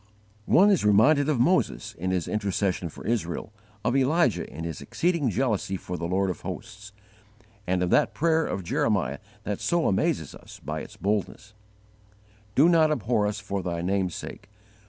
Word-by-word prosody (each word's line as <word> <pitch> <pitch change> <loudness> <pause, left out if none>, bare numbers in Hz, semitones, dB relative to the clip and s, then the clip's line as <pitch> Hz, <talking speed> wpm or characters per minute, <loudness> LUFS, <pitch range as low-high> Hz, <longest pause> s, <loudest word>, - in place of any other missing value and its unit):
'" 105 +1 -33
One 200 +4 +6
is 190 - +2
reminded 115 +9 +4
of 145 -6 +1
Moses 120 -7 +1
in 95 -1 -4
his 90 -3 -1
intercession 100 -4 -1
for - - -12
Israel, 110 -3 -2 0.3
of 120 - +1
Elijah 135 -2 +2
in 80 +4 -7
his 80 -4 -5
exceeding 170 -6 0
jealousy 110 -5 -1
for 90 - -6
the 85 -1 -3
Lord 95 +1 +1
of - - -8
hosts, 105 +2 -8 0.8
and 90 0 +1
of 90 - -1
that - - +3
prayer 160 0 +2
of 95 - -3
Jeremiah 85 - 0 0.2
that 100 0 -3
so 170 -1 +1
amazes 95 - 0
us - - -13
by - - -3
its - - -11
boldness: 105 +1 -2 1.0
"Do 145 +5 +6
not 165 -3 +5
abhor 115 -7 +1
us 105 0 -3
for 100 -1 -3
Thy 85 -2 -3
name's 95 -1 0
sake! 100 - -8
105 Hz, 175 wpm, -26 LUFS, 95-135 Hz, 1.0 s, One